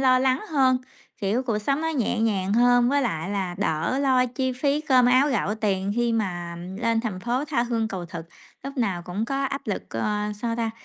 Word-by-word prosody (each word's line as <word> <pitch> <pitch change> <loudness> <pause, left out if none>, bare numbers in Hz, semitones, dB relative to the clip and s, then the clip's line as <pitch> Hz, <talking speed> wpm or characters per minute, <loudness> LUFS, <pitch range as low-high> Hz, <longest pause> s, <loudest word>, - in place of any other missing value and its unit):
lo 255 -1 +5
lắng 260 0 +2
hơn, 265 -4 +4 0.4
kiểu, 210 +6 0
cuộc 225 -4 -1
sống 275 +7 0
nó 320 - -1
nhẹ 240 -6 0
nhàng 200 -3 +1
hơn. 245 +1 +4
Với 285 0 +2
lại 180 -5 -2
là 190 -3 -2
đỡ 165 - 0
lo 260 -2 +3
chi 260 +1 -2
phí 280 +3 0
cơm 255 -5 +4
áo 260 +4 +5
gạo 210 -5 0
tiền 200 -2 -1
khi 240 -1 +1
mà 175 -6 -2 0.2
lên 230 -1 +1
thành 210 -6 -4
phố 245 +6 -1
tha 280 -6 0
hương 230 -2 -1
cầu 180 -4 -5
thực, 170 -2 -7 0.4
lúc 275 +1 -7
nào 195 -8 0
cũng 185 +6 -3
có 275 +2 -1
áp 275 -1 -4
lực, 205 - -2
ờ, 210 - -1
sao 230 -1 -1
ta, 225 -1 -1
235 Hz, 215 wpm, -25 LUFS, 200-260 Hz, 0.4 s, lo